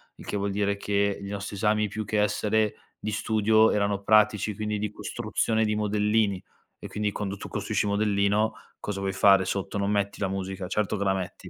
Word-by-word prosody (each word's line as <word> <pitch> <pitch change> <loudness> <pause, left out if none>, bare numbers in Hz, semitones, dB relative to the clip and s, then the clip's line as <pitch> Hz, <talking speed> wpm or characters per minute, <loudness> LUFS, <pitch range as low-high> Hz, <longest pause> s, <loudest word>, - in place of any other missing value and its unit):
il - - -13
che 105 - -2
vuol 100 0 -1
dire 100 0 0
che 100 0 0
i 100 - -6
nostri 100 +1 -5
esami 105 +1 +1
più 110 +2 -4
che 105 +1 -1
essere 105 +1 +1 0.2
di 110 - -4
studio 110 +1 +3
erano 100 -1 0
pratici, 105 0 +3
quindi 105 0 -2
di 105 0 -2
costruzione 110 0 -1
di 105 -1 0
modellini. 105 -1 +1 0.4
E - - -7
quindi 105 -1 -2
quando 100 -1 -4
tu - - -8
costruisci - - -1
modellino, 100 +1 +2
che - - -17 0.2
cosa 100 -1 -4
vuoi 95 0 -1
fare 95 0 +5
sotto, 100 +1 -3
non 100 0 0
metti 100 -1 -1
la 100 - 0
musica? 95 -1 -4
Certo 105 +2 -1
che 100 - -1
la 95 -1 +2
metti. 95 -1 -6
105 Hz, 205 wpm, -26 LUFS, 100-105 Hz, 0.4 s, fare